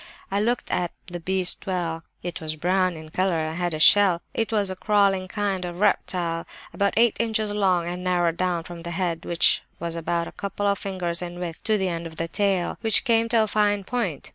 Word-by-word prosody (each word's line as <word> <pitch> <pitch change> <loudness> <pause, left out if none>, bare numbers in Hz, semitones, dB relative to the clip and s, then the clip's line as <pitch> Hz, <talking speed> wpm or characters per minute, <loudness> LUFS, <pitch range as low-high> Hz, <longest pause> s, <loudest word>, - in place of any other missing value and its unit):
I 200 +1 +1
looked 240 +3 -1
at 175 -1 -1
the 175 -2 -6
beast 185 +2 +2
well; 170 -3 -2 0.2
it 175 -1 -5
was 155 -1 -3
brown 180 +2 +1
in 155 0 -10
colour 185 +2 0
and 155 0 -2
had 175 -2 -1
a - - -5
shell; 190 0 +6
it 225 0 -1
was 205 -3 +1
a - - -4
crawling 195 -2 +2
kind 195 -1 -2
of 175 0 -6
reptile, 175 -4 0 0.3
about 200 -1 0
eight 235 -1 +4
inches 220 -2 0
long, 185 -4 +1
and 180 +1 -4
narrowed 175 -2 +1
down 180 -2 0
from 170 0 -9
the 170 - -6
head, 170 -1 -2
which 170 -1 +3 0.2
was 170 0 -3
about 170 0 -1
a - - -8
couple 200 +1 -4
of 200 -1 +2
fingers 180 -3 -3
in 175 0 -6
width, 175 -2 -5
to 215 -1 +3
the 190 -2 0
end 170 -1 -3
of 160 - -12
the 165 +1 -2
tail, 190 0 0
which 220 -1 +4
came 230 -2 +3
to 230 -1 +4
a - - -1
fine 205 -1 +1
point. 190 - -3
185 Hz, 220 wpm, -24 LUFS, 170-205 Hz, 0.3 s, shell